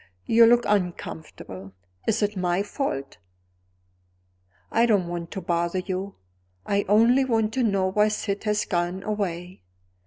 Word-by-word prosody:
You 230 0 +6
look 240 +1 +5
uncomfortable. 160 - -3 0.3
Is 225 0 +1
it 205 +1 0
my 180 +1 0
fault? 205 - -4 1.5
I 235 +1 +3
don't 200 -6 +2
want 170 -1 -5
to 190 - -5
bother 170 +1 -1
you; 190 +1 -4 0.5
I 200 0 0
only 230 +6 +5
want 225 -4 0
to 260 - 0
know 195 -5 +1
why 210 +2 +3
Syd 210 -1 -3
has 210 0 +1
gone 175 +1 -2
away. 185 -4 -4
200 Hz, 135 wpm, -25 LUFS, 175-215 Hz, 1.5 s, You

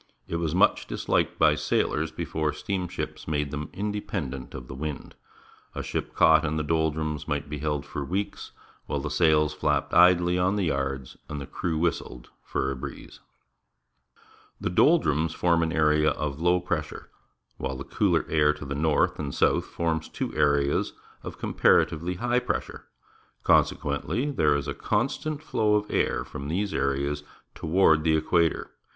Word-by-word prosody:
It 85 - -2
was 85 -1 -1
much - - +3
dis - - -6
liked - - +1
by - - +5
sailors 80 +1 0
before 80 -1 -2
steamships 95 -3 -4
made 75 -2 -1
them 75 0 -4
independent 100 -12 -4
of 65 -2 -8
the - - -8
wind. 75 +1 -5 0.6
A - - -3
ship - - -4
caught 80 -1 +6
in 80 0 -1
the 75 - 0
doldrums 80 -1 -1
might 75 0 -2
be 75 0 -5
held 75 -1 -2
for 75 - -5
weeks, 95 +8 -4 0.4
while 70 - -1
the - - -4
sails 75 -2 +3
flapped - - 0
idly 90 0 +5
on 95 +3 +2
the 100 - 0
yards, 70 -4 -2
and 75 - -4
the 70 - -6
crew 80 +3 -3
whistled 75 -7 -2
for 65 0 -1
a - - -3
breeze. 65 - -9 1.4
The - - -2
doldrums 80 - +3
form 85 -1 +2
an 80 0 0
area 75 -1 +3
of 75 0 -3
low 90 +1 +3
j)ressure, 85 -3 -4 0.5
while 65 0 -3
the 70 - -6
cooler - - +1
air 75 -1 +3
to 75 - -9
the 70 - -4
north 75 +1 +1
and 75 - -3
the - - -7
south - - +2
forms 80 -2 -2
two - - -4
areas 70 -1 +2 0.3
of - - -8
comparatively 85 +3 +2
high 120 +5 +1
pressure. - - -4 0.6
Consequenth', 140 +4 +1
there 75 -7 +3
is 70 -2 -2
a - - -2
constant 155 -1 -2
flow 105 -8 +1
of 105 0 -1
air - - 0
from 70 - -7
these 95 +6 -1
areas 70 +1 -1 0.3
toward 80 -2 +3
the 80 -1 +3
equator. 80 +1 +1
80 Hz, 165 wpm, -26 LUFS, 75-85 Hz, 1.4 s, caught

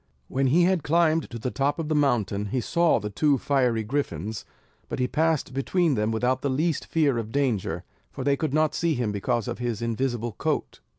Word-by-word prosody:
When 135 +1 +1
he 165 +7 +4
had 185 -1 +2
climbed 165 +1 +2
to 120 - -6
the 125 +2 -3
top 140 +1 0
of 165 -2 -3
the 155 - 0
mountain, 110 -8 +1
he 125 +6 -1
saw 170 +7 +2
the 105 0 -5
two 145 +6 +2
fiery 125 -5 +1
griffins; 110 - -3 0.4
but - - -3
he 125 - +1
passed 155 -2 0
between 160 +4 +1
them 105 -2 0
without 125 +3 0
the 140 - -1
least 155 +5 0
fear 145 -7 +2
of 110 -1 -5
danger; 110 - -1 0.3
for 135 - -6
they 140 +1 +3
could 155 0 -2
not 155 +1 +2
see 170 -1 0
him 120 -4 -1
because 115 +3 -1
of - - -4
his 120 -3 -2
invisible 120 0 -1
coat. 105 - -2
130 Hz, 210 wpm, -26 LUFS, 115-155 Hz, 0.4 s, he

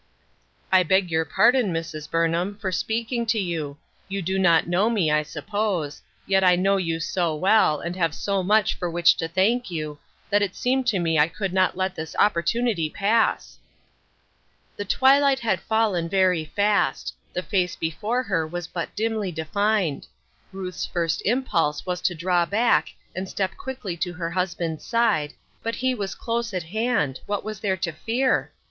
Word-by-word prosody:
I 185 -1 +6
beg 185 0 +2
your 160 0 +1
pardon, 235 +2 +3
Mrs. 160 -2 -5
Burnham, 165 +4 0
for 195 -3 -3
speaking 230 +5 -1
to 225 0 +2
you; 160 -6 -3 0.3
you 195 -1 -3
do 190 +3 -1
not 170 -3 +4
know 185 +6 +2
me, 195 -10 +1
I 150 0 +3
suppose, 185 -2 -3 0.3
but 195 0 +3
I 180 -1 +6
know 195 +2 +2
you 165 -3 -1
so 165 -1 -1
well, 185 -3 +3
and 170 +1 -4
have 165 -4 0
so 200 -1 -1
much 210 +3 +3
for 175 - -4
which 170 0 +4
to 165 - -2
thank 195 +8 +1
you, 155 -3 -5 0.3
that 205 0 +4
it 200 -2 -1
seemed 255 0 0
to 215 -5 +2
me 165 -3 +1
I 150 - +5
could 190 +2 -4
not 185 -1 +2
let 190 -1 -1
this 160 -2 -7
opportunity 205 -1 +1
pass." 215 +6 0 1.2
The 205 - -5
twilight 270 +4 +4
had 230 - +1
fallen 210 -7 0
very 185 -3 +2
fast; 205 +7 0 0.2
the 180 - -2
face 180 -4 0
before 210 +10 -2
her 165 -8 -1
was 175 +1 -5
but 170 0 -5
dimly 215 -3 -1
defined; 180 +1 -1 0.4
Ruth's 185 -2 -5
first 165 -2 -1
impulse 195 - 0
was 180 -1 -3
to 175 - 0
draw 175 +1 +1
back, 210 -6 +2 0.3
and 185 +1 -4
step 190 -1 -2
quickly 255 -9 -5
to 175 +1 -2
her 170 -2 -4
husband's 175 -3 -2
side, 220 -11 +1 0.3
but 230 0 -3
he 260 0 0
was 200 -5 -4
close 230 -3 -3
at 180 - -2
hand. 200 - -1
What 205 -1 -2
was 215 -2 -6
there 190 -3 0
to 170 -1 -2
fear 235 +11 0
185 Hz, 175 wpm, -24 LUFS, 165-215 Hz, 1.2 s, I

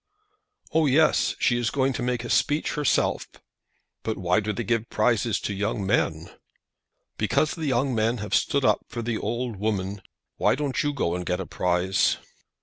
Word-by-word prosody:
"Oh, 160 -1 +3
yes; 150 +3 +3
she 120 -1 +2
is 120 -2 0
going 135 +2 +1
to 130 - -4
make 120 -1 -1
a 120 - -6
speech 150 +2 +1
herself." 150 -5 +1 0.7
"But 110 - -3
why 90 0 +2
do 105 0 -2
they 115 - -3
give 115 +1 -1
prizes 115 0 +1
to 105 - -3
young 105 0 -2
men?" - - 0 0.9
"Because 155 - +2
the 160 -3 -4
young 130 0 +1
men 115 +2 +1
have 105 -1 -5
stood 140 -2 +2
up - - +4
for 120 - -5
the 115 -1 -2
old 120 0 -3
women. 100 -1 -2 0.4
Why - - +3
don't 140 -2 -1
you 145 - 0
go 125 -12 -1
and 90 0 -3
get 90 0 -1
a 95 - -3
prize?" 90 +2 +1
115 Hz, 180 wpm, -25 LUFS, 100-130 Hz, 0.9 s, up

